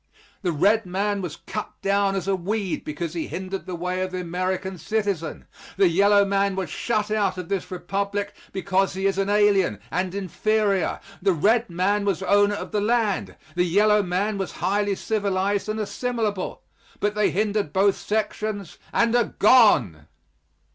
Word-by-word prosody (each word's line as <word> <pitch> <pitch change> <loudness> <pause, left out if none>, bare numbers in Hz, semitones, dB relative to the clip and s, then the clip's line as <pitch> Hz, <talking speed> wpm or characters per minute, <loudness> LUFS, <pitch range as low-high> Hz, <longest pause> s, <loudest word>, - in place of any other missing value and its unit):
The 180 -4 0
red 200 +7 +2
man 200 +2 -1
was 170 -4 -5
cut 210 +3 -7
down 200 0 +2
as 190 -1 -3
a 195 - +2
weed 195 +1 -2
because 155 +2 -4
he 165 -2 -3
hindered 190 +1 -5
the 180 - -4
way 180 +2 -2
of 185 - -1
the 185 0 -4
American 185 +1 -3
citizen. 200 -5 -2 0.3
The 195 -1 +5
yellow 200 +3 +4
man 200 0 +1
was 190 -1 -3
shut 215 -3 -1
out 205 -3 +1
of 180 -2 -6
this 195 -2 -2
Republic 200 +3 -3 0.2
because 195 0 0
he 190 +1 -2
is 195 0 +1
an 195 0 0
alien, 205 - +3
and 185 +1 -1
inferior. 200 +1 0 0.2
The 195 0 +3
red 220 +8 +2
man 190 +4 +1
was 195 -2 -1
owner 205 +2 +3
of - - -6
the 210 -2 0
land 210 - 0 0.2
the 180 - +2
yellow 210 +4 +4
man 195 +3 -1
was 195 - -3
highly 205 0 0
civilized 200 -1 -1
and 215 +1 -2
assimilable 220 -2 -2 0.4
but 205 0 0
they 210 0 +2
hindered 205 -4 0
both 195 +2 +3
sections 210 -2 -3
and 235 0 +2
are 240 -3 +1
gone! 125 - +5
195 Hz, 170 wpm, -24 LUFS, 185-210 Hz, 0.4 s, The